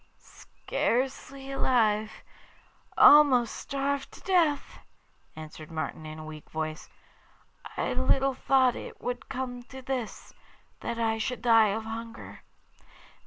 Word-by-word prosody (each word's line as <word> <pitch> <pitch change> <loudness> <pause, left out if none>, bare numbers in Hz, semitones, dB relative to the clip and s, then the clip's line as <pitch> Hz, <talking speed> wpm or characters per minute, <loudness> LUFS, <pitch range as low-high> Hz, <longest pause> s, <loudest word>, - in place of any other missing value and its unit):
'Scarcely 270 +2 -3
alive 220 -5 +2 0.9
almost 275 -6 +7
starved 275 0 -3
to - - -12
death,' 330 -7 +1 0.6
answered 155 0 -10
Martin 155 -1 -5
in 155 0 -8
a 155 - -8
weak 155 -1 -10
voice. 155 0 -5 0.9
'I - - -1
little 270 0 +2
thought 260 -1 +3
it - - -8
would 245 0 -5
come 255 -2 -4
to 265 - -10
this, 250 -4 -5 0.5
that 235 - -4
I 225 -1 0
should 240 +1 -3
die 225 -2 +6
of 215 +2 -2
hunger. 230 +1 -8
245 Hz, 120 wpm, -28 LUFS, 215-270 Hz, 0.9 s, almost